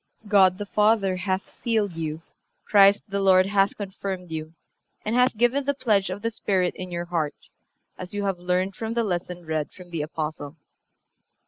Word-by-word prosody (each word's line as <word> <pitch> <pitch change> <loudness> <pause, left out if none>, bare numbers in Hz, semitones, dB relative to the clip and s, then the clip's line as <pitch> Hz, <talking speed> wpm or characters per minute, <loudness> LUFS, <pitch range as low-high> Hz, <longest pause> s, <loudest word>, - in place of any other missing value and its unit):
God 190 -3 +5
the 205 - -4
Father 210 -2 +2
hath 190 +1 -2
sealed 220 -6 -1
you; 160 -1 -4 0.4
Christ 200 -1 +6
the 200 0 -1
Lord 185 -1 +5
hath 195 0 +2
confirmed 190 -3 -5
you, 160 0 -5 0.5
and 215 +2 0
hath 250 -2 +3
given 240 +5 +2
the 285 0 +1
pledge 215 -8 +1
of 195 +3 -5
the 230 - 0
Spirit 190 -4 0
in 185 0 -6
your 175 0 -4
hearts, 160 -4 -3 0.5
as 180 -1 -7
you 205 0 -2
have 195 -3 -1
learned 180 +2 0
from 225 0 -4
the 235 - +2
lesson 180 -3 -3
read 155 -2 -2
from 180 -2 -14
the 165 -3 -2
Apostle." 150 -1 -5
190 Hz, 180 wpm, -25 LUFS, 175-205 Hz, 0.5 s, Christ